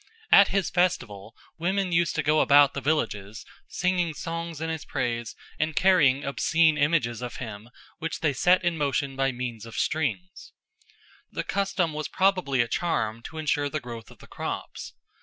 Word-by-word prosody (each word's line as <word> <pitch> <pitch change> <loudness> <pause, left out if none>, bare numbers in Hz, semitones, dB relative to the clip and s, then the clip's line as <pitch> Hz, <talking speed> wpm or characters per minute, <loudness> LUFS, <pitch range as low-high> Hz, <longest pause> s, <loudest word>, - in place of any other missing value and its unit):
At 200 - +8
his 195 -2 -1
festival 120 - -1 0.2
women 190 +2 0
used 170 -1 +1
to - - 0
go 155 +1 +3
about 145 -1 +6
the 140 - -4
villages 110 -8 -2 0.2
singing 180 -3 -1
songs 165 -1 -5
in 160 0 -3
his 160 -2 -4
praise 120 -2 -3 0.2
and 155 0 -1
carrying 150 -6 +4
obscene 160 +3 +2
images 145 -6 +1
of 125 -1 -5
him 110 -2 -8 0.3
which 165 0 -4
they 150 -3 +1
set 180 +7 +3
in 170 -2 0
motion 140 -1 -1
by 135 0 +1
means 120 -3 -5
of 115 -1 -10
strings. 105 - -2 0.8
The - - -3
custom 195 -4 -1
was 155 0 -3
probably 185 -9 +1
a 120 - 0
charm 115 -6 -1
to 160 - -8
ensure 145 -2 0
the 155 - -3
growth 120 -3 -9
of - - -16
the - - -15
crops. - - -6
150 Hz, 170 wpm, -26 LUFS, 120-170 Hz, 0.8 s, At